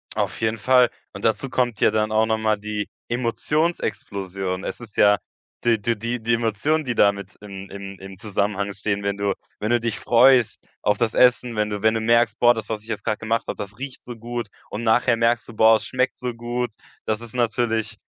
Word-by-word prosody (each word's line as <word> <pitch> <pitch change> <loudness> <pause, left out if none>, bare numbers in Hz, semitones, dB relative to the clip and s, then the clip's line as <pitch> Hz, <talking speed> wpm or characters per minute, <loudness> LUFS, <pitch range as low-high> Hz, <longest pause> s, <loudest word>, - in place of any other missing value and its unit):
Auf - - -2
jeden 110 0 0
Fall 125 +2 +4 0.2
und 100 - -9
dazu 110 +4 +1
kommt 120 -4 0
ja - - +5
dann 110 0 0
auch 110 +1 +3
noch 110 0 +1
mal 110 -1 +1
die 105 0 -4 0.2
Emotionsexplosion. 100 - -2
Es - - -5
ist 110 -4 -10
ja, 105 0 +5 0.4
die 115 -3 +2
du 115 +2 +1
die 115 +1 -2
Emotionen, 115 +8 +1
die 125 -3 -2
damit 100 -1 +1
im 100 -1 -9
im 100 -1 -8
im 95 -1 -10
Zusammenhang 100 -1 -1
stehen, 100 0 -2
wenn 100 0 -1
du 100 -1 0 0.3
wenn 105 - -2
du 120 0 +3
dich 115 -2 -2
freust 120 -2 +4 0.2
auf 105 -1 +2
das 115 -2 0
Essen, 125 -2 +3
wenn 105 0 0
du 105 -1 -4
wenn 110 0 +4
du 110 - -1
merkst: 115 -1 +3
„Boah, 120 0 +6
das, 110 -2 -6
was 110 -2 -3
ich 115 - -11
jetzt - - -4
grad 105 - -1
gemacht 115 +1 -1
habe, - - -3
das 100 +3 -7
riecht 135 -1 -7
so 120 -1 -8
gut“ 120 -1 -5 0.2
und 110 +3 -5
nachher 115 +2 +3
merkst 115 +1 +1
du: 115 - -10
„Boah, 110 +1 +6
es 110 +1 -1
schmeckt 130 0 -1
so 125 -1 -3
gut.“ 120 +1 -3 0.3
Das 110 +1 -1
ist 115 0 -9
natürlich 115 -2 0
110 Hz, 215 wpm, -23 LUFS, 105-120 Hz, 0.4 s, Boah